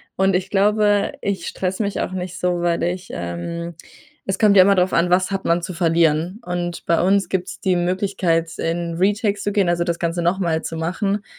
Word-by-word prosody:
Und 190 Hz, +1 st, +2 dB
ich 185 Hz, -, -1 dB
glaube, 205 Hz, 0 st, +2 dB
ich 200 Hz, -1 st, -3 dB
stresse 190 Hz, +3 st, -2 dB
mich 200 Hz, -1 st, -2 dB
auch -, -, -2 dB
nicht 185 Hz, 0 st, -5 dB
so, 180 Hz, -1 st, 0 dB
weil 170 Hz, -1 st, 0 dB
ich, 180 Hz, +1 st, -3 dB
ähm 170 Hz, -, -5 dB, 0.5 s
es 190 Hz, -, -1 dB
kommt 210 Hz, -2 st, +5 dB
ja 190 Hz, -, +9 dB
immer 200 Hz, +1 st, +4 dB
drauf 180 Hz, 0 st, +1 dB
an: 170 Hz, +1 st, +2 dB
Was 185 Hz, +2 st, +2 dB
hat 195 Hz, 0 st, -2 dB
man 170 Hz, +1 st, +2 dB
zu 185 Hz, +1 st, -5 dB
verlieren. 165 Hz, +2 st, +1 dB
Und 175 Hz, -1 st, -4 dB
bei 170 Hz, -, +2 dB
uns 195 Hz, +2 st, +2 dB
gibt 185 Hz, -1 st, -2 dB
es -, -, -8 dB
die 185 Hz, -2 st, +1 dB
Möglichkeit 175 Hz, -2 st, 0 dB
in 170 Hz, 0 st, -2 dB
Retakes 205 Hz, +3 st, 0 dB
zu 205 Hz, -, -1 dB
gehen, 200 Hz, -3 st, +2 dB
also 175 Hz, 0 st, +1 dB
das 170 Hz, -1 st, -2 dB
Ganze 170 Hz, +1 st, -1 dB
nochmal 170 Hz, -2 st, 0 dB
zu 165 Hz, -, -5 dB
machen, 195 Hz, +5 st, -2 dB
180 Hz, 210 wpm, -21 LUFS, 170-195 Hz, 0.5 s, ja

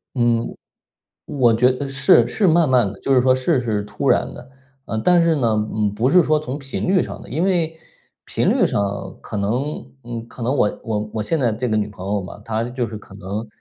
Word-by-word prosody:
嗯， 120 Hz, -1 st, +1 dB, 0.7 s
我 120 Hz, -5 st, +3 dB
觉 125 Hz, +3 st, +4 dB
得 140 Hz, +2 st, -3 dB
是 135 Hz, -3 st, +4 dB
是 205 Hz, -, +1 dB
慢 165 Hz, -2 st, +4 dB
慢 120 Hz, -6 st, +3 dB
的， 95 Hz, -, -13 dB
就 135 Hz, -, +1 dB
是 125 Hz, -, +5 dB
说 130 Hz, 0 st, +4 dB
事 130 Hz, +2 st, +1 dB
是 110 Hz, -4 st, -1 dB
突 105 Hz, -, -3 dB
然 -, -, +2 dB
的。 125 Hz, +2 st, -12 dB, 0.4 s
呃， 110 Hz, -, -3 dB
但 175 Hz, +8 st, +4 dB
是 165 Hz, -2 st, +3 dB
呢， 120 Hz, -5 st, +1 dB, 0.2 s
嗯， 105 Hz, -2 st, 0 dB
不 115 Hz, +5 st, +1 dB
是 180 Hz, +3 st, +6 dB
说 155 Hz, 0 st, +2 dB
从 140 Hz, -1 st, -5 dB
频 135 Hz, +5 st, -4 dB
率 185 Hz, -1 st, +4 dB
上 -, -, -7 dB
的， -, -, -12 dB
因 155 Hz, -, -1 dB
为 170 Hz, -4 st, 0 dB, 0.5 s
频 -, -, -1 dB
率 -, -, +3 dB
上 100 Hz, 0 st, -2 dB
可 -, -, -7 dB
能， 120 Hz, +9 st, -2 dB, 0.2 s
嗯， 115 Hz, -1 st, -6 dB
可 120 Hz, -, -10 dB
能 130 Hz, +4 st, 0 dB
我 105 Hz, -, +1 dB
我 105 Hz, -1 st, -3 dB
我 110 Hz, -, -1 dB
现 160 Hz, +10 st, 0 dB
在 120 Hz, -6 st, +1 dB
这 120 Hz, +3 st, -2 dB
个 110 Hz, -, +1 dB
女 105 Hz, -1 st, 0 dB
朋 100 Hz, -3 st, -10 dB
友 100 Hz, 0 st, 0 dB
嘛， 95 Hz, +2 st, -9 dB
她 115 Hz, 0 st, -1 dB
就 120 Hz, 0 st, -3 dB
是 110 Hz, 0 st, -7 dB
可 100 Hz, -, -15 dB
能， 100 Hz, +3 st, -5 dB
120 Hz, 245 characters per minute, -21 LUFS, 110-140 Hz, 0.7 s, 是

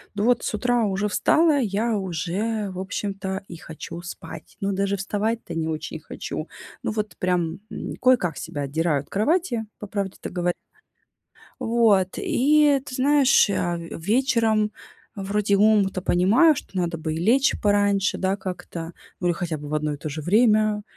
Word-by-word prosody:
Ну 205 Hz, -, -1 dB
вот 245 Hz, +1 st, +3 dB
с -, -, -2 dB
утра 245 Hz, 0 st, +1 dB
уже 200 Hz, +1 st, -1 dB
встала, 310 Hz, +6 st, +3 dB
я 220 Hz, 0 st, 0 dB
уже 195 Hz, +4 st, -2 dB
в 185 Hz, -, -7 dB
общем-то 195 Hz, 0 st, -4 dB
и 170 Hz, -, -8 dB
хочу 165 Hz, +1 st, -8 dB
спать. 165 Hz, -2 st, -9 dB
Ну, 200 Hz, 0 st, 0 dB
даже 200 Hz, +1 st, 0 dB
вставать-то 205 Hz, 0 st, -2 dB
не 160 Hz, -1 st, -1 dB
очень 155 Hz, -1 st, -4 dB
хочу. -, -, -6 dB, 0.4 s
Ну -, -, -1 dB
вот 210 Hz, -5 st, -4 dB
прям, 180 Hz, -2 st, 0 dB
м, -, -, -6 dB
кое-как 240 Hz, -11 st, +3 dB
себя 145 Hz, -, -5 dB
отдираю 145 Hz, +1 st, 0 dB
от -, -, -19 dB
кровати, 240 Hz, -, 0 dB
по 210 Hz, -, -7 dB
правде-то 195 Hz, -1 st, -4 dB
говоря. 175 Hz, -1 st, -1 dB, 1.1 s
Вот, 225 Hz, -5 st, +3 dB
и 290 Hz, +1 st, +3 dB
ты 260 Hz, -, -7 dB
знаешь, 275 Hz, -1 st, +4 dB
я 175 Hz, -3 st, 0 dB
вечером 215 Hz, +5 st, +1 dB, 0.4 s
вроде 200 Hz, 0 st, 0 dB
умом-то 205 Hz, -2 st, +3 dB
понимаю, 215 Hz, -, +4 dB
что -, -, -9 dB
надо 170 Hz, -1 st, -1 dB
бы 155 Hz, 0 st, -3 dB
и -, -, -3 dB
лечь 245 Hz, +10 st, +3 dB
пораньше, 205 Hz, -1 st, +2 dB
да, 190 Hz, +1 st, 0 dB
как-то, 180 Hz, -3 st, -6 dB, 0.3 s
ну 180 Hz, -, -1 dB
или 175 Hz, -, +2 dB
хотя 170 Hz, -3 st, -3 dB
бы 145 Hz, 0 st, -8 dB
в 155 Hz, -, -3 dB
одно 150 Hz, -1 st, -1 dB
и -, -, -6 dB
то 155 Hz, -, -5 dB
же 155 Hz, +1 st, -5 dB
время. 215 Hz, +2 st, +3 dB
200 Hz, 165 wpm, -24 LUFS, 175-225 Hz, 1.1 s, знаешь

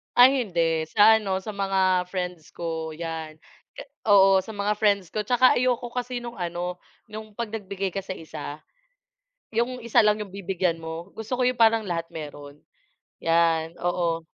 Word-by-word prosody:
Ay, 255 Hz, +1 st, +6 dB
hindi. 165 Hz, -4 st, 0 dB
Sa 220 Hz, +1 st, +7 dB
ano, 190 Hz, -3 st, -2 dB
sa 205 Hz, -, -8 dB
mga 190 Hz, -2 st, +1 dB
friends 180 Hz, -3 st, -5 dB
ko 160 Hz, -1 st, -4 dB
'yan. 160 Hz, -1 st, -6 dB, 0.6 s
Oo, 195 Hz, -2 st, +6 dB
sa 220 Hz, -, -8 dB
mga 205 Hz, 0 st, -1 dB
friends 200 Hz, -4 st, +2 dB
ko. 215 Hz, -1 st, -3 dB
Tsaka 250 Hz, +3 st, +4 dB
ayoko 245 Hz, -1 st, 0 dB
kasi 245 Hz, 0 st, -4 dB
nung 240 Hz, -1 st, -8 dB
ano, 175 Hz, 0 st, -3 dB, 0.3 s
yung 215 Hz, 0 st, -9 dB
'pag 235 Hz, +1 st, -4 dB
nagbigay 200 Hz, -3 st, -4 dB
ka 195 Hz, +2 st, -4 dB
sa 185 Hz, -, -4 dB
isa, 155 Hz, -2 st, -8 dB, 0.9 s
yung 235 Hz, +3 st, 0 dB
isa 235 Hz, 0 st, +4 dB
lang 210 Hz, -1 st, +3 dB
yung 205 Hz, -3 st, -7 dB
bibigyan 185 Hz, -3 st, -1 dB
mo. 165 Hz, +3 st, -7 dB
Gusto 225 Hz, +3 st, -4 dB
ko 250 Hz, -, +2 dB
yung 250 Hz, 0 st, +1 dB
parang 225 Hz, -1 st, +5 dB
lahat 165 Hz, -3 st, -3 dB
meron, 145 Hz, -2 st, -9 dB, 0.6 s
'yan, 165 Hz, 0 st, +2 dB
oo. 170 Hz, -2 st, -1 dB
195 Hz, 165 wpm, -25 LUFS, 165-220 Hz, 0.9 s, Sa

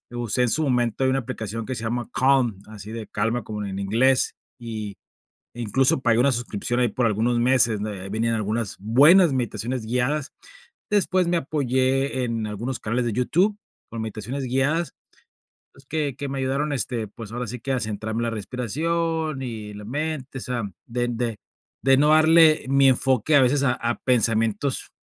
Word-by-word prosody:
Lo 120 Hz, 0 st, -5 dB
usé 120 Hz, +1 st, 0 dB
en 125 Hz, -, +2 dB
su 155 Hz, +7 st, 0 dB
momento 125 Hz, -2 st, +1 dB
de 130 Hz, -, +3 dB
una 135 Hz, -, +1 dB
aplicación 110 Hz, -2 st, -5 dB
que 130 Hz, -, -3 dB
se 110 Hz, -, -6 dB
llama 120 Hz, +1 st, -3 dB
Calm, 130 Hz, -6 st, +2 dB
así 105 Hz, -1 st, -10 dB
de 115 Hz, -2 st, -6 dB
calma 115 Hz, +3 st, -1 dB
como 105 Hz, 0 st, -5 dB
en 95 Hz, -1 st, -5 dB
inglés, 120 Hz, +7 st, +2 dB, 0.3 s
y, 110 Hz, -3 st, -6 dB, 0.6 s
incluso, 120 Hz, +3 st, +2 dB
pagué 115 Hz, -3 st, +2 dB
una 135 Hz, +3 st, +4 dB
suscripción 120 Hz, 0 st, -2 dB
ahí 125 Hz, -, +3 dB
por 115 Hz, +2 st, 0 dB
algunos 115 Hz, +3 st, +1 dB
meses, 120 Hz, -3 st, +3 dB
¿no?, 105 Hz, -, -3 dB
ahí 95 Hz, -2 st, -7 dB
venían 115 Hz, +2 st, 0 dB
algunas 110 Hz, 0 st, -2 dB
buenas 145 Hz, -, +6 dB
meditaciones 125 Hz, -1 st, -2 dB
guiadas. 125 Hz, +5 st, -1 dB, 0.6 s
Después 185 Hz, -3 st, +2 dB
me 175 Hz, -, +2 dB
apoyé 135 Hz, -2 st, 0 dB
en 115 Hz, -2 st, -2 dB
algunos 115 Hz, +5 st, -4 dB
canales 120 Hz, +3 st, -1 dB
de 115 Hz, -, -1 dB
YouTube 180 Hz, -, +1 dB, 0.3 s
con 115 Hz, -1 st, -5 dB
meditaciones 110 Hz, +5 st, -5 dB
guiadas, 135 Hz, +7 st, 0 dB, 0.8 s
pues, 135 Hz, 0 st, -20 dB
que 145 Hz, -3 st, -2 dB
que 140 Hz, -, -5 dB
me 135 Hz, 0 st, -4 dB
ayudaron, 135 Hz, +3 st, -1 dB
este, 120 Hz, -4 st, -2 dB
pues, 105 Hz, +1 st, -10 dB
ahora 120 Hz, +1 st, -3 dB
sí 120 Hz, +2 st, -7 dB
que 135 Hz, +3 st, -3 dB
a 130 Hz, -, 0 dB
centrarme 110 Hz, 0 st, -4 dB
en -, -, 0 dB
la 115 Hz, -, -1 dB
respiración 155 Hz, +7 st, -2 dB
y 110 Hz, -4 st, -6 dB
la 105 Hz, 0 st, -9 dB
mente. 140 Hz, +1 st, -4 dB
O -, -, -6 dB
sea, 125 Hz, -2 st, -3 dB, 0.2 s
de 120 Hz, 0 st, -2 dB
de 120 Hz, -2 st, -3 dB, 0.4 s
de 135 Hz, 0 st, +5 dB
no 150 Hz, +2 st, +4 dB
darle 155 Hz, -1 st, +5 dB
mi 135 Hz, 0 st, +5 dB
enfoque 130 Hz, +2 st, +2 dB
a 140 Hz, -, +6 dB
veces 135 Hz, +2 st, +2 dB
a 125 Hz, -, +3 dB
a 120 Hz, -1 st, -2 dB
pensamientos, 115 Hz, +1 st, +1 dB
125 Hz, 185 wpm, -24 LUFS, 110-135 Hz, 0.8 s, buenas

